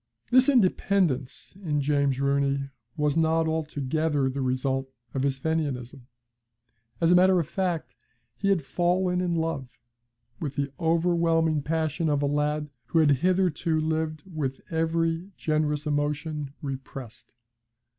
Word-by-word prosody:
This 255 +2 +6
independence 185 - +1
in 150 -5 0
James 140 -2 +1
Rooney 140 0 +1 0.3
was 150 -1 +1
not 160 0 +2
altogether 155 -2 0
the 135 +1 -3
result 130 +1 -1 0.2
of 135 - -1
his 135 -1 0
Fenianism. 135 -4 -3 0.9
As 165 0 +3
a - - +7
matter 185 0 +5
of 160 - -2
fact, 175 -2 -2 0.4
he 195 - -1
had 190 -6 +2
fallen 180 +5 +1
in 175 -2 0
love, 160 -6 -2 0.7
with 145 -4 -4
the 140 0 -1
overwhelming 165 -2 +2
passion 160 +1 -1
of 145 -1 +1
a - - +3
lad 150 +1 0 0.2
who 165 - 0
had 155 -2 +5
hitherto 175 -1 +1
lived 155 -1 -1
with 150 -8 -4
every 165 +2 0
generous 155 -1 0
emotion 150 0 -2
repressed. 135 -4 -8
155 Hz, 130 wpm, -27 LUFS, 140-165 Hz, 0.9 s, a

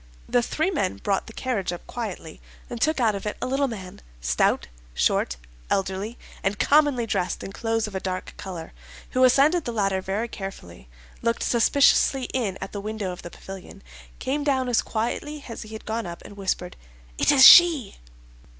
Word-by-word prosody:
The 245 - +2
three 315 +9 -1
men 280 - -1
brought 195 - -1
the - - -9
carriage 220 -6 -2
up 175 - -7
quietly, 195 -9 -6 0.3
and 235 -2 -5
took 315 0 +2
out 225 -4 +3
of 200 +1 -5
it 210 - -3
a - - -2
little 270 +2 +1
man, 190 -7 -8 0.2
stout, - - +1 0.3
short, - - +1 0.3
elderly, 195 +4 -2 0.2
and 195 +2 -1
commonly 285 -1 +3
dressed 180 -5 -2
in 195 - -7
clothes 225 +1 -1
of 210 - -8
a 190 - -2
dark 185 -1 -4
color, 175 -4 -8 0.4
who 255 - +2
ascended 285 +6 +4
the 240 - -2
ladder 195 -4 0
very 200 +5 -2
carefully, 90 - -9 0.3
looked 230 0 0
suspiciously 270 +2 +3
in 215 -8 -1
at 190 - -6
the 200 - -5
window 210 -2 -4
of 180 - -8
the 175 - -8
pavilion, 190 - -11 0.3
came 290 +3 -2
down 265 -3 +1
as 235 - +3
quietly 280 +6 -3
as 230 - -7
he 215 0 -10
had 220 - -10
gone 225 -2 -3
up, 170 0 -8
and 205 - -11
whispered, 185 -2 -3 0.4
'It - - +4
is 265 -2 +8
she! 335 - +8
220 Hz, 185 wpm, -25 LUFS, 190-255 Hz, 0.4 s, is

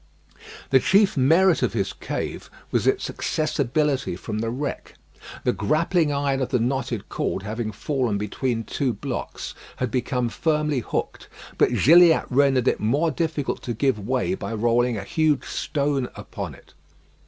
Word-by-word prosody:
The 135 - +6
chief 195 +6 +3
merit 165 +6 +4
of 125 - 0
his 100 -4 -1
cave - - -5 0.2
was - - +1
its - - +1
accessibility 145 - -1
from 105 +4 -5
the 115 +1 -1
wreck. 135 +5 -5 0.5
The - - +2
grappling 160 0 +1
iron 140 -1 0
of 130 - -1
the 125 - +2
knotted 120 -2 -2
cord 95 - -2
having 110 +1 -3
fallen 125 -1 -1
between 115 +3 -2
two 130 +2 -1
blocks, 100 - -5 0.2
had 125 -3 -2
become 125 0 0
firmly 150 0 0
hooked, 115 - -4 0.3
but - - +3
Gilliatt 170 +2 +6
rendered 135 -1 +3
it - - +2
more 145 +10 +1
difficult 155 -1 -2
to 120 - -4
give 130 -1 +1
way 130 - -1
by 115 -11 -4
rolling 120 +1 +2
a 100 - -4
huge 155 - +1
stone 140 -3 -1
upon - - -7
it. - - -20
135 Hz, 155 wpm, -24 LUFS, 115-150 Hz, 0.5 s, The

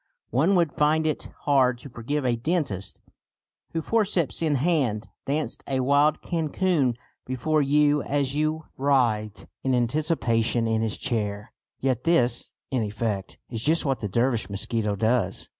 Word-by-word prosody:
One 155 - +3
would 170 -4 +2
find 155 +1 +2
it 155 - -2
hard 130 -4 +3
to 135 - -11
forgive 130 +5 -3
a 120 -1 +2
dentist 115 - -2 0.7
who, 165 -1 -1
forceps 200 -9 +1
in 155 -3 +2
hand, 135 -8 +1 0.2
danced 150 +2 -1
a 135 -1 0
wild 145 +3 +3
cancan 160 -5 +1 0.3
before 130 +5 0
you 145 +1 +3
as 140 -1 -1
you 155 +1 -1
writhed 120 -7 +1 0.2
in 130 -1 +2
anticipation 120 -3 +1
in 110 0 +1
his 110 -1 -1
chair. 105 -5 -2 0.3
Yet 130 -2 0
this, 125 -8 +2 0.2
in 130 -3 +1
effect, 105 -2 -3
is 115 -2 -3
just 160 +6 +2
what 135 -2 0
the 105 - -3
Dervish 115 -1 0
mosquito 105 +1 -1
does. 110 -2 0
130 Hz, 145 wpm, -25 LUFS, 115-155 Hz, 0.7 s, One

